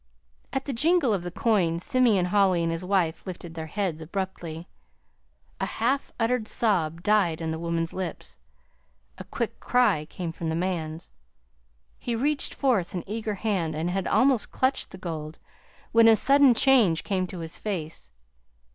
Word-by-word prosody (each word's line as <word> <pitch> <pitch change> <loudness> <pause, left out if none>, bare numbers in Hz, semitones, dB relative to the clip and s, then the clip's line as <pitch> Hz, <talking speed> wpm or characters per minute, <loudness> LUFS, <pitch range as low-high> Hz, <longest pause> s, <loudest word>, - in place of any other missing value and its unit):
At 270 0 -2
the 280 - -3
jingle 305 -1 +2
of 195 - -1
the 175 - -5
coins 175 -4 +1
Simeon 230 -8 +3
Holly 185 -2 +3
and 165 - 0
his 165 +2 -3
wife 180 -4 0
lifted 175 -2 -7
their 160 -1 -6
heads 180 -3 -2
abruptly. 170 -1 -5 0.9
A - - -1
half 260 +5 -1
uttered 230 -1 0
sob 170 -9 0
died 195 -6 +2
on 160 -1 -3
the 160 - -4
woman's 170 0 -2
lips. 185 -2 -6 0.8
A - - -6
quick - - -4
cry 220 -12 +2
came 170 +1 -5
from 165 0 -4
the 160 - -1
man's. 165 -2 -3 0.9
He 240 - -2
reached 280 +4 -1
forth 230 -11 +1
an 175 - -3
eager 215 0 -3
hand 185 -7 -1
and 165 +3 -1
had 190 0 -2
almost 260 -4 +3
clutched 260 +1 0
the - - -10
gold 160 -4 -6 0.5
when 230 0 +6
a 225 - +8
sudden 275 +1 +5
change 225 -12 +4
came 185 -3 -1
to 180 - -8
his 165 0 -6
face. 160 - -5
185 Hz, 165 wpm, -26 LUFS, 165-225 Hz, 0.9 s, a